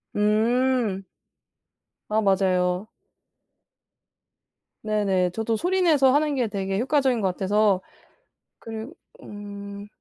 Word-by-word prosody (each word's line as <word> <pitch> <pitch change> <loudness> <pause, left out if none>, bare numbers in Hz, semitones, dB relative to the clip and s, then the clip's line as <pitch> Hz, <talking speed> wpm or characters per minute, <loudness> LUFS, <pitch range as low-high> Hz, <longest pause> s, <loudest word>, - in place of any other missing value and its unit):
음. 220 0 +1 1.1
아 215 +1 +2
맞아요. 185 -1 +1 2.0
네네. 195 -4 +1
저도 225 +2 -1
소리내서 330 - +3
하는 295 -1 +2
게 245 -3 0
되게 195 -1 -2
효과적인 260 -3 +1
것 190 - +1
같아서 195 +1 +1 0.8
그리 225 +1 -7 0.3
음 200 0 -9
210 Hz, 175 characters per minute, -24 LUFS, 195-250 Hz, 2.0 s, 소리내서